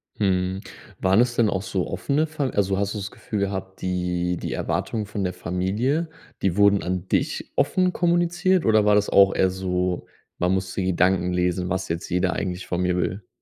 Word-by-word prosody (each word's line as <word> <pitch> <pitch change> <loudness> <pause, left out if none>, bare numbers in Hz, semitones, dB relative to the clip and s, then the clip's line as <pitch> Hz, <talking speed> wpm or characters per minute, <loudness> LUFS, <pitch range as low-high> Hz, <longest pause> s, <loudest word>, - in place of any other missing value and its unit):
Mhm. 95 -1 0 0.4
Waren 95 +4 +4
es 120 -1 +1
denn 115 -3 +3
auch 95 -2 -1
so 95 -1 -2
offene 140 - 0
Fa 150 -3 -2
also, 100 -1 0
hast 100 +1 -1
du - - -4
das 100 0 -5
Gefühl 105 - -5
gehabt, 95 -1 -3
die 90 -1 -1
die - - -4
Erwartungen 110 -2 -2
von 100 -1 -4
der 90 - -1
Familie, 105 - -1 0.3
die 95 -1 0
wurden 100 -1 +5
an 90 0 -3
dich - - -1
offen 185 -1 +2
kommuniziert 175 +1 +2
oder 110 -2 +4
war 105 - +5
das 105 0 +2
auch 100 -1 +5
eher 95 - +3
so, 90 -1 -2 0.3
man 90 +2 +2
muss 95 -1 -2
die 95 - -2
Gedanken 90 0 +2
lesen, 90 0 0
was 95 +1 -2
jetzt 85 +1 -3
jeder 90 0 +1
eigentlich 90 -1 -3
von 90 0 -1
mir 90 -1 +1
will? 90 +2 -2
95 Hz, 195 wpm, -24 LUFS, 90-105 Hz, 0.4 s, wurden